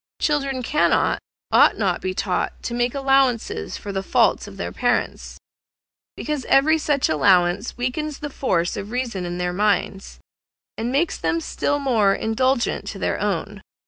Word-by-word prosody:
Children 275 Hz, -4 st, 0 dB
cannot, 300 Hz, +5 st, +2 dB, 0.3 s
ought -, -, +5 dB
not 190 Hz, -5 st, +1 dB
to -, -, -21 dB
be 185 Hz, 0 st, -3 dB
taught 185 Hz, -2 st, -2 dB
to 235 Hz, -, -4 dB
make 240 Hz, +2 st, 0 dB
allowance 270 Hz, -4 st, +2 dB, 0.3 s
for 205 Hz, -, -7 dB
the 195 Hz, -1 st, -2 dB
faults -, -, +2 dB
of -, -, -11 dB
their -, -, -4 dB
parents, -, -, -1 dB, 0.8 s
because 300 Hz, -3 st, -3 dB
every 315 Hz, +4 st, +4 dB
such 290 Hz, -3 st, +1 dB
allowance 180 Hz, +6 st, +2 dB
weakens 280 Hz, +5 st, -3 dB
the 295 Hz, -2 st, -6 dB
force 175 Hz, -11 st, 0 dB
of 200 Hz, -, -6 dB
reason 235 Hz, -6 st, -3 dB
in 175 Hz, 0 st, -4 dB
their 180 Hz, 0 st, -2 dB
minds, 200 Hz, 0 st, -1 dB, 0.6 s
and 230 Hz, +2 st, -3 dB
makes 310 Hz, +5 st, 0 dB
them 330 Hz, -, 0 dB
still 290 Hz, -2 st, -1 dB
more 230 Hz, -8 st, +2 dB
indulgent 240 Hz, +3 st, 0 dB
to -, -, -5 dB
their -, -, -1 dB
own. -, -, -2 dB
245 Hz, 160 wpm, -22 LUFS, 195-275 Hz, 0.8 s, ought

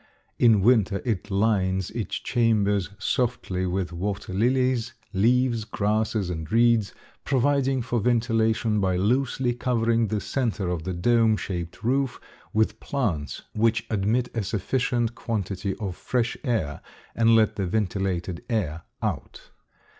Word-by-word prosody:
In 115 Hz, -4 st, +5 dB
winter 105 Hz, -3 st, +3 dB
it 105 Hz, -4 st, -2 dB
lines 95 Hz, -2 st, +1 dB
its 115 Hz, -2 st, -3 dB
chambers 105 Hz, -5 st, +1 dB
softly 110 Hz, -7 st, -1 dB
with 90 Hz, -1 st, -2 dB
water 95 Hz, +2 st, -4 dB
lilies, 125 Hz, +2 st, +1 dB, 0.2 s
leaves, 120 Hz, +3 st, +2 dB
grasses, 105 Hz, -2 st, -1 dB
and 80 Hz, -2 st, -5 dB
reeds, 115 Hz, -2 st, +3 dB, 0.3 s
providing 135 Hz, -1 st, +1 dB
for 120 Hz, -1 st, -1 dB
ventilation 115 Hz, -1 st, +1 dB
by 95 Hz, -2 st, +1 dB
loosely 125 Hz, +5 st, +1 dB
covering 115 Hz, -2 st, +1 dB
the 105 Hz, 0 st, -1 dB
center 110 Hz, -5 st, -1 dB
of 85 Hz, -2 st, -3 dB
the 95 Hz, -, -2 dB
dome 110 Hz, +4 st, +3 dB
shaped 85 Hz, -4 st, -5 dB
roof 130 Hz, +1 st, 0 dB, 0.3 s
with 110 Hz, 0 st, +1 dB
plants, 95 Hz, -, -2 dB
which 110 Hz, 0 st, +1 dB
admit 110 Hz, +4 st, +1 dB
a 115 Hz, -, 0 dB
sufficient 120 Hz, +3 st, -1 dB
quantity 100 Hz, -4 st, -3 dB
of 95 Hz, -4 st, -4 dB
fresh 120 Hz, +3 st, -1 dB
air 110 Hz, -, -1 dB, 0.3 s
and 115 Hz, 0 st, +4 dB
let 110 Hz, -1 st, +3 dB
the 95 Hz, -3 st, -2 dB
vitiated 95 Hz, -3 st, -2 dB
air 85 Hz, -9 st, -1 dB, 0.2 s
out. -, -, -4 dB
110 Hz, 130 wpm, -25 LUFS, 95-120 Hz, 0.3 s, In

